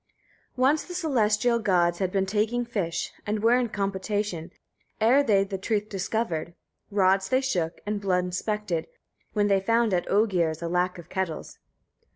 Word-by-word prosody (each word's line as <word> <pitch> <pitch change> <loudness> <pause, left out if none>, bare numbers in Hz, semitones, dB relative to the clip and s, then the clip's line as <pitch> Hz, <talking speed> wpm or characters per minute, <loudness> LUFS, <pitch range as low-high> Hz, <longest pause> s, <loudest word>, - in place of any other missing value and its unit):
1. 255 0 +3
Once 300 +2 +2
the 355 - -8
celestial 235 - +2
gods 175 -5 +2
had 190 -2 0
been 195 0 +1
taking 220 +5 0
fish, 195 -8 -3
and 210 0 -1
were 230 +2 +5
in 245 -2 -1
compotation, 195 -3 -2 0.5
ere 240 +6 +5
they 205 -8 +3
the 195 -1 -5
truth 210 +1 -1
discovered. 185 -4 -2 0.3
Rods 195 -1 +2
they 260 0 +3
shook, 180 -12 -2
and 205 0 -2
blood 180 -2 +1
inspected, 185 -1 -2 0.5
when 205 -1 +2
they 195 -1 +3
found 230 +2 +2
at 175 - 0
Oegir's 175 -6 +1
a - - -1
lack 180 +1 0
of 170 -2 -11
kettles. 190 -4 -4
200 Hz, 165 wpm, -26 LUFS, 180-225 Hz, 0.5 s, were